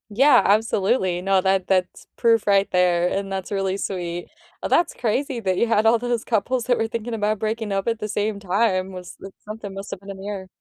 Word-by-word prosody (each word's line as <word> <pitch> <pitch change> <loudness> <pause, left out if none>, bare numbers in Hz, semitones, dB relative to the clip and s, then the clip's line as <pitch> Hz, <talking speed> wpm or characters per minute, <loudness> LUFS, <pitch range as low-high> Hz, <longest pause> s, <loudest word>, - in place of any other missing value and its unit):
Yeah, 265 +6 +5
absolutely. 200 -3 +2
No, 195 +1 +3
that 190 -1 +1
that's 185 -1 0
proof 230 -2 +3
right 200 -1 +3
there, 180 -1 +3
and 195 +1 -2
that's 190 0 -4
really 195 -1 -1
sweet. 175 -3 -4 0.3
Uh, - - -2
that's 345 - +2
crazy 255 +2 -1
that 190 -4 -1
you 235 - +2
had 220 -1 +2
all 225 +1 +5
those 240 -1 -1
couples 235 +2 0
that 245 0 +2
were 225 - 0
thinking 230 +1 -4
about 215 -1 0
breaking 220 0 -2
up 195 +1 -1
at 230 -1 0
the 210 - -3
same 205 0 -1
time, 190 -1 0
was 180 -1 -9
like 195 0 -10
something 215 -2 -7
must 195 +1 -7
have - - -5
been 200 - -12
in 195 - -9
the 195 +1 -8
air. 195 -2 -5
200 Hz, 225 wpm, -23 LUFS, 190-225 Hz, 0.3 s, Yeah